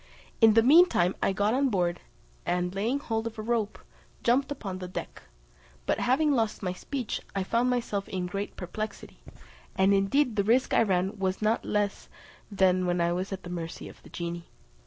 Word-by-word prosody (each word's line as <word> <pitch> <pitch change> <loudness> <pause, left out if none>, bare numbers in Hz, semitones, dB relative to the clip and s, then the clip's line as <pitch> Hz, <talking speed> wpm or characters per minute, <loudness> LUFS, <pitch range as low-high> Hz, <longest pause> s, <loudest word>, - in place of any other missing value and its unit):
In 220 -1 +7
the 225 - +6
meantime 270 - +5
I - - +2
got 205 +3 +1
on 270 +1 +2
board, 175 -5 0 0.4
and 180 0 -1
laying 220 +8 0
hold 225 -5 -2
of 225 0 -8
a 215 - -4
rope, 220 -2 -1 0.5
jumped 265 +4 +2
upon 195 -9 -5
the 180 - -5
deck, 180 - -7 0.6
but - - 0
having 295 +5 +2
lost 225 -6 0
my 180 -1 -1
speech 250 +4 -4
I 195 - 0
found 235 +6 +1
myself 230 -5 -1
in 185 -2 -2
great 195 +3 -4
perplexity: 215 +4 -6 0.6
and 190 +1 +4
indeed 215 +5 +2
the 200 - +3
risk 240 +5 +2
I - - +5
ran 195 -1 0
was 190 -1 -1
not 215 +1 +1
less 205 -1 -1 0.4
than 185 -2 +3
when 175 0 +1
I 170 0 +2
was 185 +3 -3
at 195 -1 -5
the 175 - -7
mercy 165 -2 -5
of - - -14
the - - -15
genie. 170 0 -5
200 Hz, 190 wpm, -28 LUFS, 185-230 Hz, 0.6 s, In